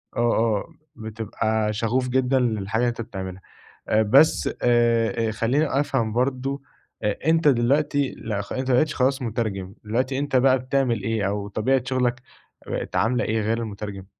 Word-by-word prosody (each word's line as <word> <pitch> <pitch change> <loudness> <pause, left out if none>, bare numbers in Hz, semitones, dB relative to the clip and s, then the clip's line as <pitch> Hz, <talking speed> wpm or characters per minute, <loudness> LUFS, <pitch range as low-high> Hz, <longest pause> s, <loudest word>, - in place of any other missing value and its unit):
آه، - - -2 0.2
آه، 110 +7 0 0.2
بتبقى 110 0 -2
شَغُوف 120 +4 0
جدًا 130 +1 +2
للحاجة 110 -3 -1
اللي 125 - +2
أنت 120 0 -5
بتعملها. 95 -4 -7 0.5
آآ 110 - +4
بس 135 +9 +4
آآ 115 -2 +2
خلّيني 125 +8 +1
أفهم 125 -6 0
برضه، 130 +3 -1 0.4
أ 105 +8 -2
أنت 160 -1 +3
دلوقتي 140 +2 +2
لأ 105 -3 -3
خ 100 - -8
أنت 130 0 -3
ما 125 - +4
بقيتش 155 +4 +2
خلاص 135 +1 +1
مُترجم 105 -5 -3
دلوقتي، 130 +5 -1
أنت 145 -1 -2
بقى 130 0 +4
بتعمل 130 -5 0
إيه، 110 -3 0
أو 100 0 -3
طبيعة 120 +6 +1
شغلك 125 -1 0 0.5
بقت - - -4
عاملة 125 +2 +1
إيه 110 0 0
غير 110 +2 0
المُترجم؟ 105 -3 -6
115 Hz, 160 wpm, -24 LUFS, 110-130 Hz, 0.5 s, آآ